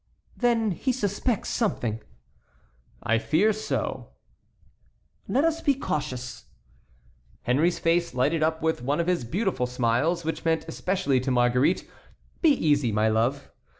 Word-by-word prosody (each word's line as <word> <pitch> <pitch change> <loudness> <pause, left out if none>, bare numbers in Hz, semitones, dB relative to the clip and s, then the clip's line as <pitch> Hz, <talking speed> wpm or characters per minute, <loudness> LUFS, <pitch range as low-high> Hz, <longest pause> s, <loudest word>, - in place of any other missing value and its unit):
"Then 230 -3 +1
he 260 +9 -1
suspects 220 -1 -1
something." 120 - -1 1.0
"I 115 +1 +2
fear 180 - +2
so." 215 +1 -4 1.1
"Let 275 - +2
us 330 0 +1
be 280 - +2
cautious." 130 - -4 1.0
Henry's 155 +8 +2
face 170 -3 +1
lighted 150 +6 +1
up 160 0 0
with 160 -5 0
one 140 +5 -1
of 170 - +1
his 180 -6 0
beautiful 180 - -1
smiles, 125 +8 0
which 160 - -3
meant 165 -1 +1
especially 160 -5 0
to 130 +2 -3
Marguerite, 125 +6 +2 0.5
"Be 330 - +5
easy, 145 - +2
my 105 +1 +2
love." 115 +6 0
160 Hz, 130 wpm, -26 LUFS, 125-195 Hz, 1.1 s, Be